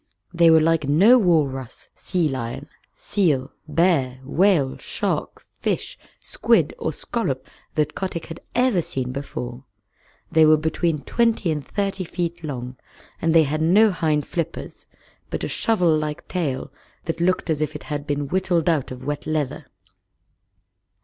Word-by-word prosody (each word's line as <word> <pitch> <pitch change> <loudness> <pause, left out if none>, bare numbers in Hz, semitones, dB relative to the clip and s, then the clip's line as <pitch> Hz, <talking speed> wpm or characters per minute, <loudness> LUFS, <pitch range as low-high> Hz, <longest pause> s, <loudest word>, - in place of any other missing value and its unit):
They 170 -1 +5
were 160 0 +7
like 160 -2 +2
no 205 - +6
walrus, 145 - 0
sea 180 -4 0
lion, 130 +1 -4 0.2
seal, 150 -10 0 0.2
bear, 150 -5 +2
whale, 155 -2 +2
shark, - - -2
fish, - - -4 0.2
squid, - - +1
or - - -1
scallop - - -3 0.3
that 150 -1 +1
Kotick 185 -3 -4
had 165 - -8 0.2
ever 245 -7 +3
seen 135 -7 -3
before. 125 -2 -6 0.7
They 160 - +5
were 155 0 +6
between 160 0 -1
twenty 230 -7 +1
and 150 -2 -2
thirty 195 0 -2
feet 170 -1 -4
long, 125 -4 -5 0.4
and 165 0 +2
they 165 - +7
had 155 +2 -2
no 200 +7 +5
hind 155 -4 0
flippers, 170 -1 -5 0.4
but - - -4
a - - -1
shovel 180 -8 +2
like 155 -1 -3
tail 145 -6 -3 0.3
that 165 0 -3
looked 180 -1 +1
as 155 -1 -1
if 155 - -2
it - - -7
had 145 -1 -5
been 145 -1 -1
whittled 180 0 0
out 160 -6 +1
of 130 0 -8
wet 145 +1 -3
leather. 150 -2 -2
155 Hz, 150 wpm, -23 LUFS, 140-175 Hz, 0.7 s, were